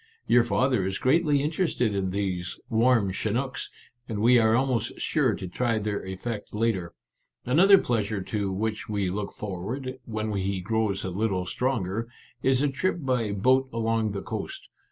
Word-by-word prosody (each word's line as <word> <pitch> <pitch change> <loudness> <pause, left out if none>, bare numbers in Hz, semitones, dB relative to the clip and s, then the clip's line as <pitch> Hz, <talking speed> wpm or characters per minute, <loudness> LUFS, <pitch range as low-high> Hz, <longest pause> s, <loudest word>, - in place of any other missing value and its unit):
Your 120 -1 +5
father 125 -2 +1
is 95 0 -2
greatly 145 +1 +3
interested 150 - 0
in 95 -1 -1
these 95 -2 -3
i - - -14
warm 115 -3 +3
chinooks/ 120 +7 -2 0.4
and 110 - -3
we 120 +3 +6
are 110 0 +4
almost 120 -3 0
sure 130 -9 +1
to 95 - -6
try 115 +5 0
their 105 -1 -2
effect 105 +3 -5
later. 105 -6 -1 0.5
Another 185 +10 +7
pleasure 110 - -1
to 100 0 -2
which 110 +3 -3
we 100 -3 0
look 100 +1 -3
forward, 120 +7 -5
when 110 -1 -3
he 95 -1 -1
grows 105 0 -1
a 95 - -3
little 95 -1 -1
stronger, 115 -1 -1 0.3
is 130 +1 +3
a - - +3
trip 145 +8 0
by 125 -6 0
boat 130 +6 +3
along 115 -2 0
the 100 - -4
coast. - - -6
110 Hz, 165 wpm, -26 LUFS, 100-130 Hz, 0.5 s, Another